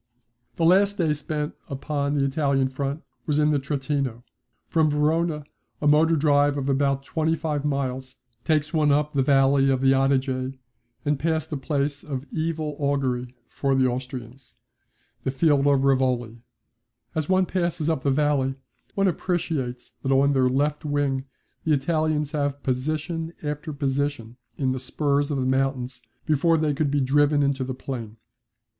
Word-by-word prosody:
The 165 - +1
last 200 +4 +4
day 160 -4 +2
spent 150 0 -3 0.2
upon 140 +1 -2
the 140 -1 +2
Italian 140 -2 +1
front 140 +3 -3 0.2
was 150 -2 +1
in 150 0 +3
the 145 - +2
Trentino. 135 -3 -2 0.4
From 160 -2 +2
Verona 150 +1 +1 0.4
a - - -3
motor 160 +3 +5
drive 145 -1 +3
of 135 -1 -2
about 140 0 +1
twenty 160 +3 0
five 155 -3 -2
miles 130 -3 -2 0.3
takes 155 0 +1
one 155 -2 +3
up 150 +1 +1
the 140 - +2
valley 135 0 +4
of 130 -1 +2
the 135 0 +5
Adige, 135 -1 0 0.5
and 145 -1 +1
past 160 +1 -1
a - - -1
place 140 0 -2
of 135 -2 -5
evil 155 -2 -2
augury 130 -3 -1
for 135 -1 0
the 130 -1 +3
Austrians, 125 0 -5 0.7
the - - -1
field 140 +1 +3
of 140 -1 +3
Rivoli. 125 -4 +1 0.7
As 155 -1 -2
one 185 0 +4
passes 170 -4 -1
up 160 -5 0
the 140 - +1
valley 135 -1 +1 0.4
one 195 0 +2
appreciates 160 -9 -2
that 135 - -1
on 140 +1 +4
their 130 -1 +3
left 145 +4 0
wing 145 -3 0 0.4
the 160 - +2
Italians 150 0 0
have 145 -2 -2
position 155 +5 -2
after 150 +1 -4
position 140 -4 -2 0.2
in 130 -2 0
the 130 - -2
spurs 140 +2 0
of 145 - -1
the 130 - 0
mountains 130 -1 -1 0.2
before 165 +2 +3
they 155 -2 +1
could 150 0 0
be 145 0 +1
driven 145 +2 +3
into 140 -1 0
the 130 0 -4
plain. 115 -5 -6
140 Hz, 160 wpm, -25 LUFS, 135-150 Hz, 0.7 s, motor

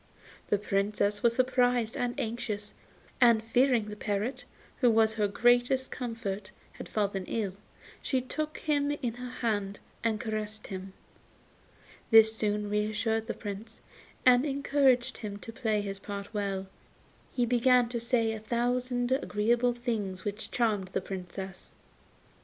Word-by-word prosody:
The 205 - +3
Princess 205 +1 0
was 235 -1 +3
surprised 245 -3 +2
and 245 0 -2
anxious, 215 -2 -3 0.5
and 235 -3 +6
fearing 245 0 +3
the 210 - -6
parrot, 210 +4 -2 0.3
who 245 - +4
was 220 -1 +4
her 210 -2 +1
greatest 245 +5 +3
comfort, 220 -5 -4 0.2
had - - -9
fallen 200 -3 -1
ill, 205 -5 -2 0.5
she 260 - 0
took 305 +4 -3
him 290 -2 +1
in 275 -5 -2
her 250 +1 -7
hand 205 -5 -2 0.2
and 220 -2 +1
caressed 215 -1 -3
him. 190 -1 -7 1.2
This 220 -1 +7
soon 210 -1 -1
reassured 215 +2 0
the 235 - -3
Prince, 210 +2 -7 0.5
and 250 0 +7
encouraged 275 -3 +2
him 205 -2 -5
to 225 +2 -9
play 220 -4 0
his 195 -1 -5
part 200 +1 -7
well, 200 -2 -1
and 190 - -11 0.6
he 245 - +1
began 245 +1 +4
to 240 -1 -2
say 230 -1 +1
a 220 - -4
thousand 245 +2 0
agreeable 240 -1 +2
things 215 -6 -3
which 210 +1 -4
charmed 215 -6 +1
the - - 0
Princess. 190 0 -7
225 Hz, 140 wpm, -30 LUFS, 205-245 Hz, 1.2 s, This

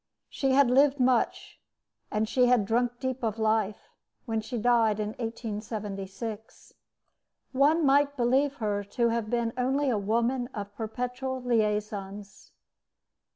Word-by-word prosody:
She 270 -1 0
had 270 -2 +5
lived 275 +2 +4
much, 250 -1 0 0.5
and 215 +1 0
she 250 +2 +3
had 245 -4 +3
drunk 240 +3 0
deep 260 -1 -3
of 225 -2 -2
life, 215 -2 0 0.4
when 225 -3 -1
she 240 +3 -5
died 225 -2 +2
in 210 0 -1
1876. 215 -2 -6 0.8
One 295 +5 +3
might 285 +1 +3
believe 265 +4 +2
her 210 -4 -2
to 235 +4 0
have 230 -2 -2
been 235 -1 -1
only 265 +2 +1
a 215 - 0
woman 235 +4 0
of 205 -1 -6
perpetual 250 +3 -4
liaisons. 210 -3 -2
235 Hz, 130 wpm, -28 LUFS, 215-255 Hz, 0.8 s, had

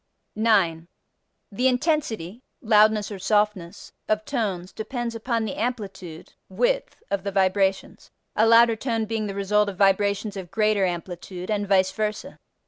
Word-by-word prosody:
9. 190 -7 +2 0.6
The 245 +6 +1
intensity 250 - -1 0.2
(loudness 215 -2 +3
or 200 - -6
softness) 205 -3 -1 0.2
of 215 0 0
tones 195 -9 -3
depends 235 +1 -4
upon 230 0 -2
the 205 - -4
amplitude 195 -9 -5 0.2
(width) - - -1
of 200 -1 -1
the 200 - -3
vibrations, 190 0 0 0.3
a 220 - +4
louder 230 0 +6
tone 225 -1 -2
being 220 -1 -2
the 195 - -5
result 205 +1 +1
of 190 - -8
vibrations 200 +1 +2
of 190 -3 -7
greater 215 -2 +2
amplitude, 180 +2 -5
and 205 -1 -1
vice 190 -1 +3
versa. 215 +1 -4
210 Hz, 140 wpm, -24 LUFS, 190-225 Hz, 0.6 s, louder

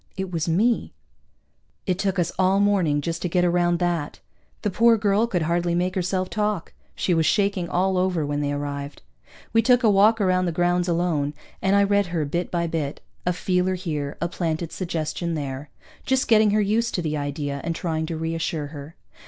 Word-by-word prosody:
It 190 -1 -3
was 165 0 -1
me. 220 +8 +1 0.9
It 185 -2 -1
took 195 -1 0
us 175 -3 +1
all 190 +1 +3
morning 185 -8 +2
just 165 +2 -3
to 180 - -1
get 180 +1 +2
around 175 0 +2
that. 170 -4 -2 0.4
The 210 - 0
poor 230 +4 +5
girl 210 +2 +2
could 180 -7 -1
hardly 170 +1 0
make 180 +1 0
herself 185 0 -1
talk. 210 -4 -2 0.2
She 180 - 0
was 160 -2 +2
shaking 200 -4 +1
all 185 +1 +1
over 180 -4 0
when 145 0 -2
they 145 0 -1
arrived. 145 0 -5 0.5
We 225 - +5
took 245 +2 +4
a 220 - +5
walk 210 +3 +5
around 185 -2 +2
the 175 - 0
grounds, 175 +1 +1
alone, 165 -4 0 0.3
and 190 +1 +2
I 200 - +5
read 200 -1 +2
her 165 -3 -1
bit 170 +5 -2
by 170 -1 -1
bit 160 -4 -3 0.3
a - - +4
feeler 180 +1 0
here, 150 -6 -4
a 170 - 0
planted 165 -2 -3
suggestion 170 -1 -3
there, 140 -1 -5 0.3
just 265 0 +1
getting 215 -2 +5
her 210 +1 +3
used 220 +3 0
to 175 - -1
the 155 -1 -1
idea 145 -1 -3
and 170 0 -2
trying 160 -2 -2
to 165 -1 -4
reassure 160 -1 -2
her. 145 +2 -9
175 Hz, 195 wpm, -24 LUFS, 160-195 Hz, 0.9 s, poor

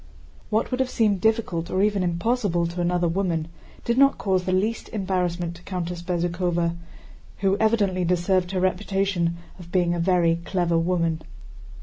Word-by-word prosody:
What 220 +4 0
would 255 - -1
have 260 -1 +1
seemed 210 -6 +1
difficult 220 -7 0
or 190 +1 +1
even 205 -2 +2
impossible 180 0 0
to 170 +1 -3
another 175 0 +1
woman 170 -2 -1 0.4
did 235 +2 +1
not 275 0 +5
cause 185 -2 0
the 185 - 0
least 210 +5 0
embarrassment 180 -4 -2
to - - -16
Countess 180 -2 -4
Bezúkhova, 175 -1 -1 0.7
who 195 -1 +3
evidently 205 -5 +2
deserved 180 +1 +1
her 190 0 -1
reputation 185 -2 0 0.2
of 175 -1 -12
being 175 -2 +2
a 175 - -2
very 170 -1 +3
clever 175 -2 +1
woman. 165 -2 0
180 Hz, 155 wpm, -24 LUFS, 170-195 Hz, 0.7 s, not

